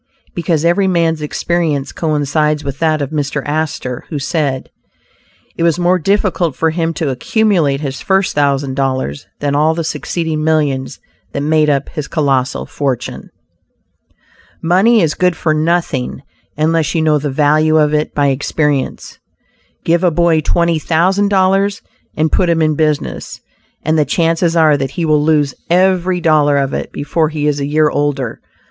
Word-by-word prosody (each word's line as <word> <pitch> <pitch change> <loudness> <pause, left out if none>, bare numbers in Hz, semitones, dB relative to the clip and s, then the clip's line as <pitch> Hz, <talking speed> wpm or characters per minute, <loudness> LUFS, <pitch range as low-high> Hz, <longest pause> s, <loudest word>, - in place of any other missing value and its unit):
Because 170 -2 -1
every 190 +3 +2
man's 165 -3 +1
experience 150 -2 -1
coincides 150 -1 0
with 140 0 -5
that 155 -2 +1
of 140 - -5
Mr. 145 -2 -2
Astor, 145 -4 -3
who 155 - -3
said, 140 -2 -2 0.8
"it - - -6
was 170 -1 +2
more 180 +1 +2
difficult 185 -4 0
for 160 0 +1
him 165 0 -1
to 150 -3 -1
accumulate 160 - +1
his 135 -3 -5
first 190 -1 +1
thousand 140 -2 0
dollars, 130 - -2
than 145 -1 0
all 155 +2 +2
the 165 - -2
succeeding 160 -1 -3
millions 145 -4 0 0.3
that 140 - -2
made 155 0 +2
up 140 -1 0
his 150 -2 -5
colossal 135 -4 0
fortune." 135 -4 -4 1.3
Money 195 +6 +3
is 155 - +1
good 180 -1 +1
for 160 -1 0
nothing 155 -5 -1 0.3
unless 160 +1 +1
you 160 - +1
know 155 -1 +3
the 145 +1 -3
value 155 +3 +2
of 150 -1 +2
it 150 0 -1
by 145 -1 +2
experience. 145 +1 -2 0.7
Give 170 +2 +2
a 180 - +5
boy 170 -1 +2
twenty 170 +1 +1
thousand 185 +6 +1
dollars 195 0 +1 0.3
and 155 0 +1
put 180 - +2
him 165 -1 +2
in 155 0 +2
business, 150 -1 -2 0.4
and 155 +1 +1
the 150 - +3
chances 165 +3 +1
are 155 -3 +4
that 135 -1 -2
he 170 - 0
will 155 -1 +3
lose 150 -3 +2 0.2
every 185 0 +2
dollar 150 -3 +3
of 135 -1 -1
it - - -4
before 155 +2 -1
he 150 -2 -3
is 145 -1 0
a 140 - -2
year 150 0 +2
older. 140 -5 -2
155 Hz, 165 wpm, -15 LUFS, 145-170 Hz, 1.3 s, a